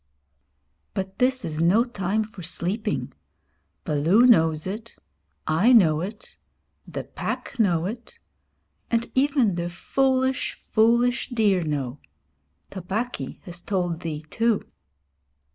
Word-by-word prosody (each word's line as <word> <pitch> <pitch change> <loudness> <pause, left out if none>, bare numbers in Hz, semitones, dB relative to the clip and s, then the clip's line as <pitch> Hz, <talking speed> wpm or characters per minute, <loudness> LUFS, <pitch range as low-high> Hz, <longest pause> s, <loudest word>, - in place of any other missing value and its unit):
'But 190 0 -4
this 255 0 +2
is 155 0 -3
no 185 +8 +4
time 215 -3 -1
for 215 -3 -11
sleeping. 170 - -3 0.7
Baloo 165 +11 +3
knows 160 -10 +4
it; 220 +4 -6 0.5
I 165 +10 +3
know 160 -9 +5
it; 205 +4 -8 0.5
the - - -5
Pack 275 - -5
know 175 -6 +2
it; 230 +5 -7 0.7
and 235 0 0
even 265 -6 +3
the 170 0 -2
foolish, 260 +7 0
foolish 235 +3 +2
deer 210 -7 +2
know. 140 -3 -3 0.7
Tabaqui 190 - -4
has 175 -1 -7
told 175 -4 -1
thee, 155 -2 -5
too.' 230 -2 +1
195 Hz, 110 wpm, -24 LUFS, 165-235 Hz, 0.7 s, know